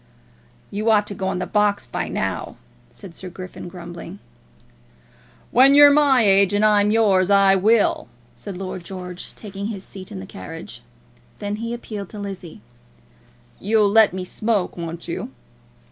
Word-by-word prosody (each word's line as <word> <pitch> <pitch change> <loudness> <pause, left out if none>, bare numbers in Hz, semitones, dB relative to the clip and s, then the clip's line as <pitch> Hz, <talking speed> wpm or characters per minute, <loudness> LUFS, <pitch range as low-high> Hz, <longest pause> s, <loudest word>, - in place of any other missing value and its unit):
"You 215 +3 -1
ought 210 -2 +4
to 210 - -5
go 190 -1 -4
on 190 -1 -1
the 180 - -2
box 210 -1 +1
now," - - -3 0.3
said 190 -4 -12
Sir 185 +2 -8
Griffin, 180 0 -9
grumbling. 175 -1 -9 1.3
"When 270 +3 +6
you're 290 0 +9
my 285 -4 +4
age, 195 0 +4
and 210 +1 +3
I'm 210 -1 +4
yours, 205 -4 +3
I 195 -1 +5
will," 210 +3 +2 0.3
said 180 +11 -9
Lord 185 -1 -6
George, 180 -1 -8
taking 200 -1 -7
his 200 -4 -6
seat 190 -1 -11
in 95 - -6
the 95 - -8
carriage. 95 0 -9 0.6
Then 205 0 -4
he 230 +1 -4
appealed 215 -5 -6
to 210 - -9
Lizzie. 190 - -8 1.0
"You'll 210 -1 +2
let 220 0 +6
me 185 +1 -5
smoke, 210 0 -1
won't 170 -1 -7
you?" - - -4
200 Hz, 155 wpm, -21 LUFS, 185-215 Hz, 1.3 s, you're